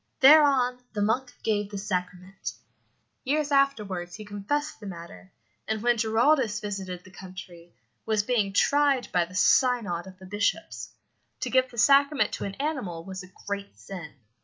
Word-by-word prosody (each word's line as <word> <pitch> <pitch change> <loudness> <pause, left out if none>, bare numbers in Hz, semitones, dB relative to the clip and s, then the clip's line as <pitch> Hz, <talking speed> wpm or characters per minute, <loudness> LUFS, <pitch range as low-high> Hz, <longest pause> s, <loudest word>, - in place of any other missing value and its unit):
Thereon 270 -3 +6
the 210 - -2
monk 245 +4 0
gave 205 -2 0
the 205 - -6
sacrament. 185 -1 -4 0.7
Years 295 +2 0
afterwards 210 -11 +1
he 215 - -9
confessed 205 +10 -3
the 210 - -9
matter, 170 - -10 0.4
and 220 0 -2
when 240 0 +4
Giraldus 225 0 +2
visited 190 -4 -5
the 185 - -16
country, 180 -2 -11 0.3
was 215 -2 +1
being 215 -4 +1
tried 280 +4 +2
by 175 -1 +2
the 180 +2 -13
synod 205 -2 +2
of 185 -1 -12
the 190 - -13
bishops. 205 +2 -2 0.5
To - - -2
give 260 0 +3
the 240 - -14
sacrament 280 +4 +4
to - - -4
an 195 -1 -5
animal 260 - -3
was 190 0 -6
a 185 0 -13
great 200 - -5
sin. 155 - -9
205 Hz, 160 wpm, -27 LUFS, 185-255 Hz, 0.7 s, Thereon